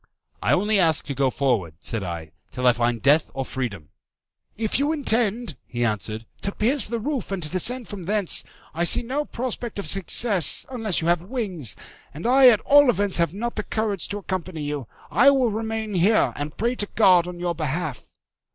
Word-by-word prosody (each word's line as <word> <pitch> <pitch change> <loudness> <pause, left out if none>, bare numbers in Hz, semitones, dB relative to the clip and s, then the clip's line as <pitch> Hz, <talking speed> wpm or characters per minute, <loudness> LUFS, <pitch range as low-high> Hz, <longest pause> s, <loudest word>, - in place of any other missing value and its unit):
"I - - +2
only 205 +2 +2
ask 160 -4 +2
to 140 - -4
go 135 0 +1
forward," 115 - -1
said 115 +2 -3
I, 85 -4 -6 0.2
"till 125 -1 -4
I 125 - +6
find 120 -1 -1
death 145 -2 +4
or 135 -1 -3
freedom." 105 - -5 0.7
"If 220 +2 0
you 290 +2 +1
intend," 240 - +1
he 120 -1 -2
answered, 110 0 -3 0.2
"to 200 - -2
pierce 245 +5 +1
the 235 +2 -3
roof 270 0 -3
and 190 -3 -3
to 150 - -4
descend 235 +8 0
from 205 -3 -7
thence, 205 -1 +2 0.3
I 170 +2 -1
see 175 - +4
no 275 +5 -2
prospect 240 -3 -5
of 200 - -4
success, 195 - +2
unless 225 -9 -1
you 165 - -2
have 175 -1 +2
wings; 185 - -4 0.4
and 160 - -8
I 260 +2 +6
at 220 -4 +3
all 290 -1 +5
events 205 -4 +2
have 170 -3 +1
not 235 +3 -4
the - - 0
courage 210 -4 -2
to 205 - -4
accompany 185 -5 -5
you. 145 -4 -4 0.2
I 275 - +6
will 260 -4 +2
remain 220 0 -3
here, 195 +5 +3
and 145 +1 -6
pray 235 +3 0
to 205 - -1
God 180 -5 +5
on 180 -1 -7
your 175 -1 -1
behalf." 155 -2 -4
190 Hz, 195 wpm, -23 LUFS, 145-225 Hz, 0.7 s, I